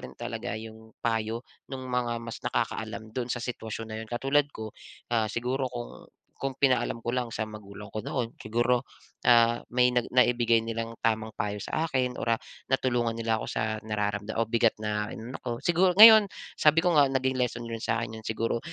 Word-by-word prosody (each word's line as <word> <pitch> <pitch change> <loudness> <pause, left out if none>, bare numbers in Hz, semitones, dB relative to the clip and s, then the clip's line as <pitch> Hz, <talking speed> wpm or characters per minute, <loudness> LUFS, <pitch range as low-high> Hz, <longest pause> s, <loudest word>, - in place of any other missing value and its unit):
rin 65 0 -10
talaga - - -4
yung 110 0 -11
payo 115 +1 -1 0.2
nung 130 -1 -6
mga 120 -1 0
mas 115 - -7
nakakaalam 110 0 -3
dun 125 -1 -3
sa 125 - -1
sitwasyon 115 -2 -5
na - - -4
yun. 110 - -9
Katulad 135 +5 +1
ko, 110 -6 -8 0.4
ah, 110 -2 +2
siguro 125 +4 -1
kung 120 -1 -8 0.3
kung 135 -1 -3
pinaalam 130 -3 +2
ko 120 +1 -3
lang 125 -2 -1
sa 110 0 -3
magulang 105 -1 -10
ko 110 - -3
noon 120 -3 -3
siguro, 120 +2 +1 0.5
ah, 120 0 +5
may 125 0 +3
na 125 - +3
naibigay 120 -2 +4
nilang 115 0 -4
tamang 110 -1 0
payo 105 0 -2
sa 160 +1 -1
akin 130 -4 -1
or 115 - +1
ah, - - -7 0.3
natulungan 120 -3 +1
nila 115 -1 0
ako - - -5
sa 110 -1 -2
nararamdam 105 0 -2
o 115 - +2
bigat 115 -1 +3
na 105 0 -1
ano 115 +3 -7
ko. 125 - -5
Siguro 180 +1 +3
ngayon 220 +1 +10 0.3
sabi 155 +2 +5
ko 175 -3 +3
nga, 145 - +7
naging 130 0 0
lesson 120 -1 -1
learned 115 -1 -5
yun - - -3
sa 115 - +1
akin 110 -1 -6
yun. 110 - -13
Siguro 115 +1 -1
115 Hz, 195 wpm, -28 LUFS, 110-125 Hz, 0.5 s, ngayon